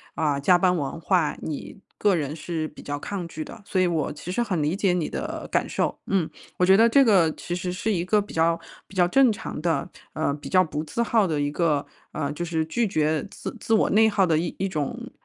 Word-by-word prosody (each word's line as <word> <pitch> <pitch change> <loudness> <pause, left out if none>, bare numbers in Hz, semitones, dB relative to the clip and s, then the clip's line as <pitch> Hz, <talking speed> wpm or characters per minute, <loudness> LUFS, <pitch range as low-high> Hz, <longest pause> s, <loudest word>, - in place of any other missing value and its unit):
啊， 150 -3 0
加 175 +6 +5
班 180 0 +3
文 140 -1 -3
化， 170 -3 +1
你 155 +5 -6 0.2
个 200 -3 +3
人 150 -1 -3
是 160 -1 -3
比 150 - -13
较 145 0 -4
抗 190 +2 -4
拒 155 -1 -6
的。 235 - -11
所 185 -2 0
以 180 - +3
我 160 -4 -1
其 170 +4 -7
实 240 +5 0
很 185 -8 -1
理 150 +4 0
解 195 -3 +2
你 170 -4 -1
的 - - -5
感 - - +1
受， - - -1
嗯。 185 -5 0 0.3
我 180 - +3
觉 190 +1 +6
得 230 +2 +6
这 275 +4 +5
个 185 -9 +4
其 175 - -5
实 180 0 -3
是 215 +4 -1
一 175 -4 0
个 210 +3 +3
比 200 - -10
较 165 +1 +2 0.3
比 195 - -15
较 180 -2 +4
正 260 +5 +5
常 200 - -6
的， 160 -4 -1 0.2
呃， 155 -2 0
比 145 - -10
较 185 -1 +4
不 155 -2 -4
自 200 +9 -3
耗 230 -3 +3
的 155 -5 -1
一 145 - 0
个 150 -2 +1 0.3
呃， 145 -2 -2
就 175 +3 -4
是 165 -2 0
拒 230 +7 0
绝 155 -4 0
自 - - -7
自 225 - -1
我 220 - +4
内 220 +2 +5
耗 200 -2 +3
的 160 -3 +2
一 175 +3 -2
种 150 -7 -4
175 Hz, 260 characters per minute, -25 LUFS, 155-195 Hz, 0.3 s, 觉